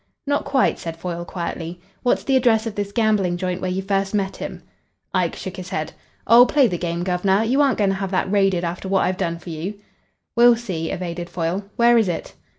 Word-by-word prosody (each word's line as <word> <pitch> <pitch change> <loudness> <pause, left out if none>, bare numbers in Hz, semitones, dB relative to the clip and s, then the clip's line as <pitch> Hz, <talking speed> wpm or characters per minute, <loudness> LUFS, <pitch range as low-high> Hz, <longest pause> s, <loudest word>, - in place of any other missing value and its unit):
"Not 285 0 0
quite," 270 -2 +2
said 165 -1 -6
Foyle 170 0 -4
quietly. 170 -1 -5 0.2
"What's 245 - +1
the 270 - +1
address 235 -3 +3
of 225 - -3
this 205 -1 -3
gambling 205 -5 +1
joint 180 0 -3
where 185 - -1
you 190 +1 -2
first 195 +1 0
met 195 -2 -1
him?" - - -7 0.5
Ike - - +1
shook 190 -2 -6
his 185 0 -7
head. 155 -3 -3 0.3
"Oh, 235 +3 +8
play 285 -2 +4
the 180 -7 -1
game, 170 0 -2
guv'nor. 190 +3 +2
You 255 +6 +2
aren't 275 -2 +3
going 200 -2 +2
to - - -1
have 195 -1 -3
that 190 0 -1
raided 195 -3 +2
after 175 +2 -4
what 195 -1 +3
I've 185 0 -1
done 170 -3 -1
for 170 0 -9
you?" 165 +6 -4 0.6
"We'll 240 0 +7
see," 185 -9 -4
evaded 175 -1 -4
Foyle. 180 +3 -2
"Where 235 0 +5
is 215 -5 +1
it?" 165 - -4
190 Hz, 220 wpm, -22 LUFS, 175-220 Hz, 0.6 s, Oh